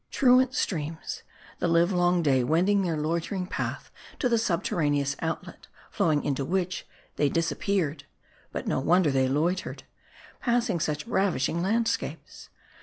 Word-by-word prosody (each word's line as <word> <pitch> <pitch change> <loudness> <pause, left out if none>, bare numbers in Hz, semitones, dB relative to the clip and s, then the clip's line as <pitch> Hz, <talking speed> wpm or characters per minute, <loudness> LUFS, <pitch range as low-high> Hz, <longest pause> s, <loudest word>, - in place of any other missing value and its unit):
Truant 255 0 +4
streams: 160 - -3 0.4
the - - +1
livelong 175 +1 +3
day 135 -4 +3
wending 180 +9 +3
their 170 -4 -1
loitering 170 +5 -2
path - - -4 0.3
to 255 - +1
the 235 -2 +2
subterraneous 145 -8 0
outlet,* 165 0 -5 0.2
flowing 150 -3 +1
into 140 -1 0
which, 185 +4 -2 0.3
they 145 - +3
disappeared. 165 -2 -1 0.5
But - - -4
no - - 0
wonder 170 +2 +3
they 130 -1 +2
loitered; 165 +7 -1 0.6
passing 235 -6 +1
such 150 -1 -2
ravishing 175 - 0
landscapes. 225 +5 -2
170 Hz, 125 wpm, -27 LUFS, 150-195 Hz, 0.6 s, Truant